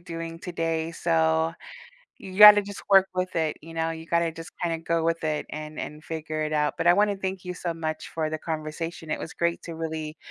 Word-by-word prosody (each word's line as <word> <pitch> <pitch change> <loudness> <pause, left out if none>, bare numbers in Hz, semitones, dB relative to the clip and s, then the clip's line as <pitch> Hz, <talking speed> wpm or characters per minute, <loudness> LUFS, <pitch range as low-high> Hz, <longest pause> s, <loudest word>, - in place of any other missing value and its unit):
doing 165 -1 -6
today, 165 -2 -2
so, 160 -1 +1 0.6
you 190 0 -9
gotta 210 0 +10
just 200 0 -8
work 195 -1 +7
with 185 0 -2
it, 160 -2 0
you 165 +1 -11
know? 165 0 0
You 160 0 -7
gotta 170 -1 +1
just 165 0 -9
kinda 165 -2 -1
go 165 0 -1
with 165 0 0
it 155 -1 -1
and 155 0 -7
and 150 +1 -6
figure 155 -1 -4
it 155 0 -2
out, 150 -1 +1
but - - +1
I 175 - +8
wanna 205 0 +2
thank 190 -1 -4
you 180 - -4
so 175 -1 -3
much 155 -1 -4
for 160 -1 -2
the 155 0 -3
conversation, 160 +1 -5
it - - -2
was 160 - -6
great 170 0 0
to 170 - -7
really 160 -1 -4
165 Hz, 220 wpm, -26 LUFS, 160-175 Hz, 0.6 s, gotta